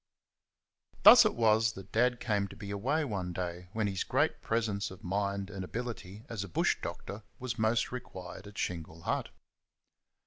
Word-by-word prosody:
Thus -, -, +11 dB
it -, -, +2 dB
was 110 Hz, -1 st, +4 dB
that 95 Hz, -1 st, -11 dB
Dad 120 Hz, +1 st, +2 dB
came 105 Hz, -4 st, 0 dB
to 95 Hz, -, -12 dB
be 100 Hz, -1 st, -7 dB
away 130 Hz, +10 st, 0 dB
one 95 Hz, -7 st, -3 dB
day 90 Hz, 0 st, -4 dB
when 110 Hz, -1 st, 0 dB
his 95 Hz, -2 st, -1 dB
great -, -, +1 dB
presence 110 Hz, -3 st, -1 dB
of 95 Hz, +1 st, -12 dB
mind 100 Hz, +1 st, -1 dB
and 95 Hz, -2 st, -5 dB
ability 110 Hz, -1 st, -6 dB
as 110 Hz, -4 st, -4 dB
a 100 Hz, -, -8 dB
bush -, -, +2 dB
doctor 100 Hz, +2 st, -6 dB, 0.2 s
was 125 Hz, -2 st, -4 dB
most 110 Hz, +1 st, +2 dB
required 95 Hz, -6 st, -7 dB
at 105 Hz, -, -12 dB
Shingle 80 Hz, -2 st, -4 dB
Hut. -, -, -1 dB
100 Hz, 170 wpm, -31 LUFS, 95-115 Hz, 0.2 s, Thus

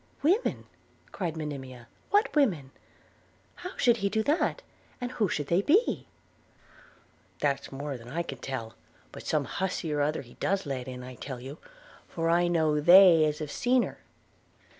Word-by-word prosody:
'Women!' 380 Hz, +11 st, +1 dB, 0.5 s
cried 170 Hz, -4 st, -3 dB
Monimia, 130 Hz, -5 st, -7 dB, 0.2 s
'what 410 Hz, -2 st, +2 dB
women? 175 Hz, -, +2 dB, 0.9 s
How 360 Hz, +1 st, -8 dB
should 240 Hz, -3 st, +4 dB
he 200 Hz, -2 st, 0 dB
do 220 Hz, +2 st, 0 dB
that? 330 Hz, -, 0 dB, 0.4 s
and 245 Hz, -1 st, -4 dB
who 215 Hz, -6 st, 0 dB
should 145 Hz, -, -2 dB
they 170 Hz, +6 st, +2 dB
be?' 380 Hz, -, +2 dB, 1.3 s
'That's 140 Hz, -2 st, -1 dB
more 140 Hz, 0 st, -5 dB
than 115 Hz, +1 st, -12 dB
I 170 Hz, +6 st, -2 dB
can 135 Hz, -7 st, -7 dB
tell; 115 Hz, -5 st, -5 dB, 0.4 s
but -, -, -10 dB
some 150 Hz, -3 st, +1 dB
hussy 180 Hz, 0 st, -2 dB
or 145 Hz, -, 0 dB
other 150 Hz, +1 st, 0 dB
he 120 Hz, -, -16 dB
does 195 Hz, -1 st, 0 dB
let 130 Hz, -3 st, -4 dB
in, 125 Hz, -1 st, -7 dB
I 130 Hz, 0 st, -8 dB
tell 125 Hz, +1 st, -7 dB
you, 135 Hz, +5 st, -9 dB, 0.5 s
for 165 Hz, 0 st, -1 dB
I 175 Hz, +1 st, +3 dB
know 160 Hz, -3 st, +2 dB
they 175 Hz, 0 st, +8 dB
as 150 Hz, -1 st, -1 dB
have 150 Hz, -2 st, -5 dB
seen 250 Hz, 0 st, +2 dB
her. -, -, -7 dB
160 Hz, 165 wpm, -28 LUFS, 135-200 Hz, 1.3 s, they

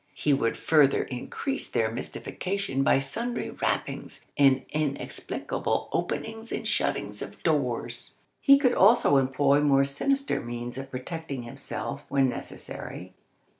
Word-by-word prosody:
He 150 Hz, -, +2 dB
would 125 Hz, -4 st, +1 dB
further 150 Hz, -4 st, +4 dB
increase 265 Hz, -, -4 dB
their -, -, +1 dB
mystification 195 Hz, -7 st, -3 dB
by 135 Hz, -, +4 dB
sundry 235 Hz, -, -3 dB
rappings, -, -, -3 dB
and 135 Hz, -2 st, +5 dB
inexplicable 150 Hz, -2 st, -2 dB
openings 225 Hz, +1 st, -3 dB
and -, -, -3 dB
shuttings -, -, -1 dB
of -, -, -8 dB
doors. -, -, -1 dB, 0.2 s
He 275 Hz, -1 st, +7 dB
could 255 Hz, -3 st, +3 dB
also 205 Hz, -, +5 dB
employ 135 Hz, +2 st, +3 dB
more 140 Hz, -2 st, +4 dB
sinister 275 Hz, -, 0 dB
means 120 Hz, +2 st, -5 dB
of 135 Hz, 0 st, -7 dB
protecting 135 Hz, 0 st, -5 dB
himself 120 Hz, -, -5 dB
when 135 Hz, -1 st, +3 dB
necessary. -, -, -7 dB
140 Hz, 125 wpm, -27 LUFS, 135-200 Hz, 0.2 s, He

